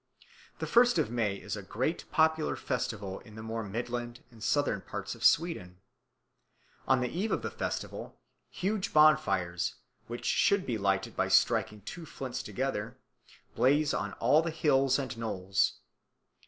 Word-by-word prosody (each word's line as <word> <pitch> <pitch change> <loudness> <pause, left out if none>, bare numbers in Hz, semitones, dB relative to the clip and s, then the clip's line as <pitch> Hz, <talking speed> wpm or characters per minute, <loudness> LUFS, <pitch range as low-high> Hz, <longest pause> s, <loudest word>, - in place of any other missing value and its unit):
The - - -3
first 245 0 +5
of 110 - +1
May 110 -5 0
is - - -5
a - - -6
great - - -2
popular 160 0 +2
festival 105 -6 -3
in 110 -2 -15
the 110 - -8
more 115 0 -3
midland 120 +3 -4
and 115 -2 -12
southern 145 -9 +1
parts 100 0 -5
of - - -10
Sweden. 150 - +2 1.1
On 130 -1 +4
the 125 - +1
eve 195 - -2
of - - 0
the - - -3
festival - - -5 0.3
huge 195 +1 -2
bonfires, 120 - +3 0.3
which 120 +1 -6
should 200 -1 +3
be 115 -4 -2
lighted 95 -1 0
by - - +1
striking 105 -1 +2
two 160 - -8
flints 130 -2 -5
together, 125 -3 -3 0.6
blaze 145 +3 +3
on 100 +1 -2
all 140 +7 +4
the 165 - -2
hills 135 -5 +3
and 130 -3 -4
knolls. 95 -4 0
120 Hz, 155 wpm, -30 LUFS, 105-150 Hz, 1.1 s, first